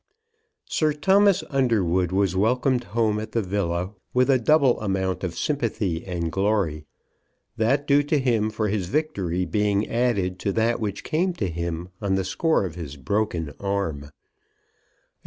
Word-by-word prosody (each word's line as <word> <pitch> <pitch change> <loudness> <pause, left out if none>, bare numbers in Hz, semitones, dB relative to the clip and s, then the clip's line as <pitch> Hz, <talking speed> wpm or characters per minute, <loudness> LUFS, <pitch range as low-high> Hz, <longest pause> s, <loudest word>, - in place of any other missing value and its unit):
Sir 155 -1 +1
Thomas 195 +5 +3
Underwood 95 - +1
was 95 -1 +1
welcomed 125 +5 +1
home 110 -2 0
at 110 +1 -7
the 115 - +1
villa 90 -1 -2 0.2
with 125 +2 +4
a 130 - +4
double 135 -1 +3
amount 95 -3 -1
of 85 -3 -3
sympathy 110 - -1
and 85 -3 -2
glory, 95 -5 0 0.7
that 135 +6 +1
due 145 0 +4
to 150 +1 +1
him 115 -5 +1
for 110 0 -2
his 100 -3 -1
victory 95 - -1
being 105 0 +1
added 100 -7 0
to 100 - -1
that 115 +1 +1
which 100 -3 -3
came 175 +4 0
to 100 - -2
him 85 +1 -4
on 100 -2 +1
the 95 -1 -1
score 155 - +1
of 90 - -5
his 80 -4 -7
broken 85 0 -2
arm. 100 -8 -2
105 Hz, 155 wpm, -24 LUFS, 90-125 Hz, 0.7 s, with